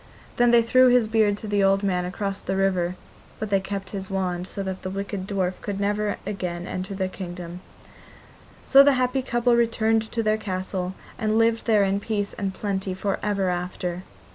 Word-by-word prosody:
Then 240 Hz, 0 st, +5 dB
they 235 Hz, -1 st, +6 dB
threw 255 Hz, +3 st, +5 dB
his 245 Hz, -3 st, +4 dB
beard 215 Hz, -2 st, +2 dB
to 215 Hz, -, -7 dB
the 205 Hz, -1 st, +2 dB
old 195 Hz, +1 st, +3 dB
man 180 Hz, -2 st, 0 dB
across 195 Hz, +2 st, -3 dB
the 190 Hz, -, -2 dB
river, 185 Hz, -2 st, +1 dB, 0.4 s
but 215 Hz, -1 st, -5 dB
they 195 Hz, -, +4 dB
kept 195 Hz, 0 st, -5 dB
his 195 Hz, -2 st, -5 dB
wand, 185 Hz, -2 st, -2 dB
so 200 Hz, -, -4 dB
that 190 Hz, -1 st, -4 dB
the 185 Hz, -, -4 dB
wicked 195 Hz, 0 st, -4 dB
dwarf 185 Hz, -2 st, -2 dB
could 200 Hz, -1 st, -4 dB
never 205 Hz, +1 st, 0 dB
again 180 Hz, -3 st, -4 dB
enter 185 Hz, +2 st, -4 dB
their 190 Hz, -1 st, -1 dB
kingdom. 175 Hz, -1 st, -7 dB, 1.0 s
So 275 Hz, -, +8 dB
the 280 Hz, 0 st, +6 dB
happy 255 Hz, +1 st, +1 dB
couple 240 Hz, -1 st, +2 dB
returned 225 Hz, -1 st, +1 dB
to 230 Hz, -, -1 dB
their 215 Hz, 0 st, +2 dB
castle, 185 Hz, -2 st, -3 dB, 0.2 s
and 215 Hz, 0 st, +1 dB
lived 225 Hz, +1 st, +2 dB
there 215 Hz, -3 st, +5 dB
in 195 Hz, 0 st, +1 dB
peace 205 Hz, -1 st, -2 dB
and 195 Hz, -2 st, -3 dB
plenty 190 Hz, -1 st, -3 dB
for 195 Hz, +1 st, -2 dB
ever 200 Hz, -3 st, 0 dB
after. 180 Hz, 0 st, -3 dB
200 Hz, 190 wpm, -24 LUFS, 185-220 Hz, 1.0 s, So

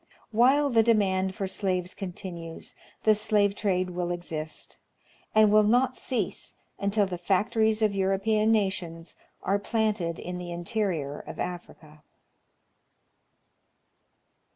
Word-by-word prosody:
While 265 Hz, +6 st, +4 dB
the 225 Hz, -1 st, +5 dB
demand 190 Hz, -4 st, +2 dB
for 195 Hz, -, -2 dB
slaves 185 Hz, -2 st, -1 dB
continues, 175 Hz, -3 st, -7 dB, 0.3 s
the 215 Hz, -, +6 dB
slave 205 Hz, -1 st, +2 dB
trade 185 Hz, -3 st, 0 dB
will 175 Hz, 0 st, -2 dB
exist, 160 Hz, -3 st, -4 dB, 0.6 s
and 215 Hz, -1 st, +6 dB
will 215 Hz, 0 st, +7 dB
not 245 Hz, +4 st, +3 dB
cease 230 Hz, -7 st, -3 dB, 0.2 s
until 200 Hz, +1 st, +2 dB
the 180 Hz, -2 st, -5 dB
factories 220 Hz, +4 st, +1 dB
of 210 Hz, -2 st, +3 dB
European 195 Hz, +3 st, +2 dB
nations 180 Hz, -6 st, -1 dB, 0.3 s
are 200 Hz, +1 st, +1 dB
planted 205 Hz, -6 st, -1 dB
in 180 Hz, 0 st, -5 dB
the 175 Hz, -1 st, -6 dB
interior 170 Hz, -5 st, -2 dB
of -, -, -9 dB
Africa. 160 Hz, -4 st, -7 dB
195 Hz, 115 wpm, -27 LUFS, 175-215 Hz, 0.6 s, will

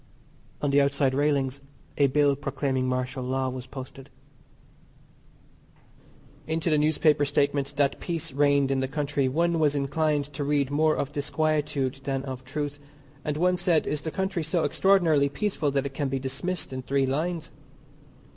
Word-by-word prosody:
On 145 Hz, -, +2 dB
the 140 Hz, +1 st, +5 dB
outside 140 Hz, -1 st, +2 dB
railings 140 Hz, -1 st, +1 dB, 0.4 s
a 140 Hz, -, +4 dB
bill 140 Hz, +1 st, +3 dB
proclaiming 130 Hz, -2 st, -1 dB
Martial 130 Hz, +1 st, -2 dB
Law 130 Hz, +1 st, -1 dB
was 130 Hz, 0 st, -6 dB
posted. 135 Hz, 0 st, -9 dB, 2.4 s
Into 160 Hz, +1 st, 0 dB
the 155 Hz, -, +4 dB
newspaper 150 Hz, 0 st, +3 dB
statement 140 Hz, 0 st, 0 dB
that 140 Hz, -1 st, +1 dB
peace 170 Hz, -2 st, -4 dB
reigned 140 Hz, -1 st, +3 dB
in 135 Hz, -, +1 dB
the 130 Hz, -, 0 dB
country 145 Hz, -1 st, -1 dB
one 170 Hz, +4 st, +1 dB
was 150 Hz, -2 st, +3 dB
inclined 145 Hz, +1 st, 0 dB
to 145 Hz, +1 st, -3 dB
read 140 Hz, -1 st, +1 dB
more 155 Hz, +2 st, +3 dB
of 140 Hz, -, -2 dB
disquietude 145 Hz, -2 st, -1 dB
than 135 Hz, -1 st, -2 dB
of 130 Hz, -1 st, -6 dB
truth, 145 Hz, +2 st, -4 dB, 0.4 s
and 150 Hz, 0 st, -2 dB
one 180 Hz, +2 st, +2 dB
said 175 Hz, -3 st, +2 dB
is 150 Hz, -, -2 dB
the 160 Hz, -, -3 dB
country 190 Hz, +1 st, -2 dB
so 160 Hz, +2 st, 0 dB
extraordinarily 160 Hz, -3 st, +3 dB
peaceful 160 Hz, -1 st, -1 dB
that 140 Hz, 0 st, 0 dB
it 140 Hz, -, -4 dB
can 140 Hz, 0 st, -1 dB
be 135 Hz, -, -1 dB
dismissed 135 Hz, +5 st, -3 dB
in 130 Hz, -, -4 dB
three 135 Hz, +1 st, +1 dB
lines. 160 Hz, +5 st, -2 dB
145 Hz, 160 wpm, -26 LUFS, 135-155 Hz, 2.4 s, the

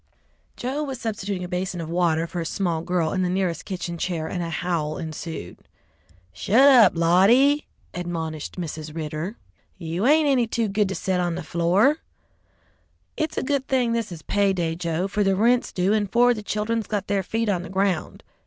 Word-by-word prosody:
Joe 265 Hz, +4 st, -3 dB
was 270 Hz, -4 st, -4 dB
substituting 200 Hz, -5 st, -3 dB
a -, -, -4 dB
basin 180 Hz, 0 st, -3 dB
of 165 Hz, -, -4 dB
water 165 Hz, -1 st, +1 dB
for 175 Hz, 0 st, -4 dB
a -, -, -4 dB
small 170 Hz, -4 st, -1 dB
girl 170 Hz, -2 st, 0 dB
in 190 Hz, -, 0 dB
the 180 Hz, -, +1 dB
nearest 180 Hz, -2 st, -1 dB
kitchen 175 Hz, -3 st, -5 dB
chair, 165 Hz, -3 st, -2 dB
and 175 Hz, +2 st, -3 dB
a 170 Hz, -, -3 dB
howl 160 Hz, -3 st, -2 dB
ensued. 160 Hz, -, -6 dB, 0.8 s
"Shut 225 Hz, -, +4 dB
up, 240 Hz, -9 st, +7 dB
Lottie!" 210 Hz, -, +4 dB, 0.3 s
admonished 165 Hz, -2 st, -5 dB
Mrs. 155 Hz, -2 st, -6 dB
Ridder, 160 Hz, +6 st, -4 dB, 0.4 s
"you 175 Hz, +5 st, -2 dB
ain't 305 Hz, +1 st, +5 dB
any 255 Hz, -4 st, +3 dB
too 225 Hz, 0 st, 0 dB
good 205 Hz, 0 st, +1 dB
to 195 Hz, -, -3 dB
set 185 Hz, -1 st, -1 dB
on 175 Hz, -1 st, 0 dB
the 180 Hz, -, -5 dB
floor. 180 Hz, -, +2 dB, 1.2 s
It's 315 Hz, -, -2 dB
a -, -, 0 dB
good 275 Hz, -1 st, -1 dB
thing 250 Hz, -3 st, +1 dB
this 230 Hz, -4 st, -2 dB
is 160 Hz, -3 st, -8 dB
pay 200 Hz, -1 st, +2 dB
day, 170 Hz, -3 st, -1 dB
Joe, 170 Hz, +1 st, -2 dB
for 205 Hz, +1 st, 0 dB
the 195 Hz, -1 st, +2 dB
rent's 240 Hz, +5 st, +2 dB
due 185 Hz, +3 st, +1 dB
and 205 Hz, -3 st, 0 dB
four 245 Hz, +1 st, +5 dB
of -, -, +1 dB
the 215 Hz, -, -6 dB
children's 215 Hz, +2 st, -2 dB
got 205 Hz, -2 st, -2 dB
their 200 Hz, 0 st, 0 dB
feet 225 Hz, +4 st, -2 dB
on 190 Hz, -4 st, +1 dB
the -, -, -8 dB
ground. 190 Hz, -3 st, -1 dB
185 Hz, 195 wpm, -24 LUFS, 170-225 Hz, 1.2 s, up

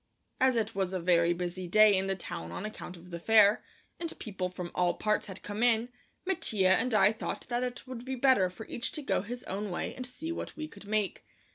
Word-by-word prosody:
As 260 Hz, -2 st, +4 dB
it 225 Hz, -1 st, 0 dB
was 190 Hz, -2 st, -1 dB
a 185 Hz, -, -1 dB
very 170 Hz, -1 st, +3 dB
busy 180 Hz, +1 st, -3 dB
day 215 Hz, +2 st, +6 dB
in 190 Hz, 0 st, +1 dB
the 195 Hz, -, 0 dB
town 85 Hz, -, -6 dB
on 185 Hz, -, -5 dB
account 215 Hz, -4 st, -7 dB
of 180 Hz, +1 st, -14 dB
the 170 Hz, -, -5 dB
fair, 215 Hz, +2 st, +5 dB, 0.4 s
and 335 Hz, -1 st, -4 dB
people 190 Hz, -5 st, -4 dB
from 180 Hz, -1 st, -6 dB
all 180 Hz, -1 st, +2 dB
parts 215 Hz, 0 st, 0 dB
had 190 Hz, -, -9 dB
come 205 Hz, +1 st, -4 dB
in, 240 Hz, 0 st, +3 dB, 0.4 s
Mattia 315 Hz, -, +1 dB
and 250 Hz, +6 st, +3 dB
I 195 Hz, 0 st, +6 dB
thought 220 Hz, -, -5 dB
that 240 Hz, 0 st, 0 dB
it 250 Hz, 0 st, -4 dB
would 255 Hz, -2 st, -7 dB
be 265 Hz, +1 st, -3 dB
better 250 Hz, -8 st, +4 dB
for 215 Hz, +5 st, -10 dB
each 235 Hz, -, -3 dB
to 305 Hz, -, -4 dB
go -, -, +1 dB
his 240 Hz, +5 st, -6 dB
own 205 Hz, +2 st, -4 dB
way 175 Hz, -, -3 dB
and 255 Hz, -, -6 dB
see 310 Hz, +6 st, -6 dB
what 335 Hz, -, -5 dB
we 310 Hz, 0 st, -4 dB
could 200 Hz, -8 st, -14 dB
make. 210 Hz, -2 st, -1 dB
210 Hz, 235 wpm, -30 LUFS, 185-245 Hz, 0.4 s, day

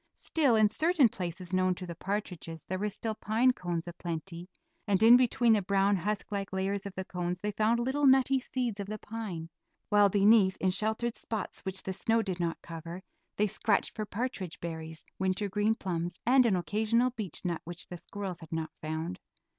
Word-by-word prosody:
Still, 285 Hz, -8 st, +2 dB
in 215 Hz, -1 st, +6 dB
certain 310 Hz, -, +3 dB
places 180 Hz, -1 st, -6 dB
known 185 Hz, 0 st, +2 dB
to 180 Hz, -, -7 dB
the 170 Hz, -, -6 dB
partridges 175 Hz, -4 st, -4 dB
there 185 Hz, 0 st, -3 dB
were 210 Hz, +1 st, 0 dB
still 220 Hz, +2 st, -3 dB
pine 225 Hz, +4 st, +2 dB
cones 175 Hz, -5 st, -3 dB
a 175 Hz, -, -5 dB
plenty, 170 Hz, +1 st, -6 dB, 0.4 s
and 200 Hz, 0 st, +2 dB
in 235 Hz, +2 st, +10 dB
between 245 Hz, -2 st, +4 dB
the 210 Hz, -, +3 dB
brown 195 Hz, +1 st, +2 dB
husk 205 Hz, +4 st, -2 dB
like 200 Hz, -1 st, -3 dB
layers 195 Hz, +1 st, -1 dB
of 195 Hz, -, -9 dB
the 190 Hz, -, -4 dB
cones 180 Hz, -1 st, -3 dB
they 210 Hz, +2 st, -2 dB
found 220 Hz, +3 st, +2 dB
little 270 Hz, +4 st, +2 dB
nutty 265 Hz, 0 st, +5 dB
seeds 245 Hz, -4 st, -3 dB
of 200 Hz, -, -4 dB
the 215 Hz, +1 st, -4 dB
pine, 210 Hz, -7 st, -6 dB, 0.4 s
while 205 Hz, -1 st, +5 dB
beneath, 200 Hz, -1 st, +5 dB
in 185 Hz, -, +2 dB
sheltered 220 Hz, +4 st, -1 dB
spots 220 Hz, -2 st, -5 dB
which 190 Hz, 0 st, -3 dB
the 190 Hz, -, -3 dB
snow 225 Hz, +4 st, +1 dB
did 185 Hz, -3 st, -4 dB
not 170 Hz, -1 st, -2 dB
cover, 170 Hz, +2 st, -8 dB, 0.3 s
they 210 Hz, -, +3 dB
scratched 210 Hz, +1 st, 0 dB
for 215 Hz, -1 st, -3 dB
partridge 210 Hz, -7 st, -4 dB
berries, 160 Hz, -1 st, -6 dB, 0.2 s
wintergreen 205 Hz, +3 st, +1 dB
plums, 175 Hz, -4 st, -3 dB
and 255 Hz, +1 st, +5 dB
an 205 Hz, -, +3 dB
occasional 220 Hz, +8 st, +1 dB
beechnut 185 Hz, -6 st, -4 dB
which 175 Hz, +1 st, -6 dB
the 175 Hz, -, -8 dB
squirrels 190 Hz, -1 st, -6 dB
had 160 Hz, -, -12 dB
not 160 Hz, -1 st, -3 dB
found. 160 Hz, +4 st, -4 dB
195 Hz, 190 wpm, -30 LUFS, 180-220 Hz, 0.4 s, in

